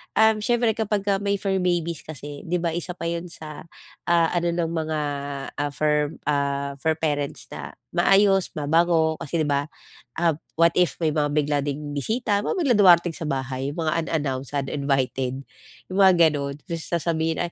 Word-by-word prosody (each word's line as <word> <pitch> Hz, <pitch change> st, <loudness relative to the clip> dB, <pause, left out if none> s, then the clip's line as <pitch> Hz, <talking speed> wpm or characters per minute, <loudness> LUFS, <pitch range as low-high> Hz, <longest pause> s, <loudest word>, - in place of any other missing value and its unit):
um, 220 Hz, 0 st, +5 dB
siyempre 240 Hz, -1 st, +2 dB
kapagka 205 Hz, -2 st, 0 dB
may 200 Hz, 0 st, +1 dB
fur 195 Hz, -1 st, 0 dB
babies 170 Hz, -3 st, -1 dB
kasi 145 Hz, -1 st, -8 dB
'di 180 Hz, +2 st, 0 dB
ba 170 Hz, -2 st, 0 dB
isa 175 Hz, +1 st, -3 dB
pa 170 Hz, -, -6 dB
'yun 170 Hz, +1 st, -3 dB
sa, 155 Hz, -2 st, -9 dB, 0.4 s
ah, 170 Hz, -1 st, +4 dB
ano 175 Hz, 0 st, +1 dB
ng 170 Hz, -1 st, -1 dB
mga, 160 Hz, -2 st, -2 dB, 0.6 s
ah, 145 Hz, 0 st, -1 dB
fur 150 Hz, 0 st, +1 dB, 0.2 s
ah, 140 Hz, -1 st, 0 dB
fur 160 Hz, +2 st, +1 dB
parents 145 Hz, -3 st, -2 dB
na -, -, -7 dB, 0.2 s
maayos, 195 Hz, +1 st, +4 dB
mabango 160 Hz, +1 st, +2 dB
kasi 165 Hz, +3 st, -2 dB
di 155 Hz, -, +1 dB
ba? 140 Hz, +1 st, 0 dB, 0.5 s
Ah, 165 Hz, -3 st, +1 dB, 0.2 s
what 170 Hz, +1 st, +5 dB
if 180 Hz, -4 st, +3 dB
may 155 Hz, -, +3 dB
mga 150 Hz, -1 st, +1 dB
bigla 145 Hz, -1 st, +1 dB
ding 145 Hz, +1 st, -4 dB
bisita, 205 Hz, -, 0 dB
mga -, -, -1 dB
biglang 260 Hz, -10 st, +3 dB
dumarating 175 Hz, -3 st, +6 dB
sa 160 Hz, -, -5 dB
bahay, 135 Hz, -1 st, -2 dB
'yung 145 Hz, -, -9 dB
mga 155 Hz, 0 st, 0 dB
unannounced, 140 Hz, -3 st, -2 dB
uninvited. 135 Hz, -2 st, -1 dB, 0.5 s
'Yung 185 Hz, -, -3 dB
mga 190 Hz, -1 st, +7 dB, 0.2 s
gano'n, 140 Hz, -1 st, -3 dB
tapos 165 Hz, -1 st, -5 dB
sasabihin, 165 Hz, -1 st, -1 dB
160 Hz, 170 wpm, -24 LUFS, 145-175 Hz, 0.6 s, mga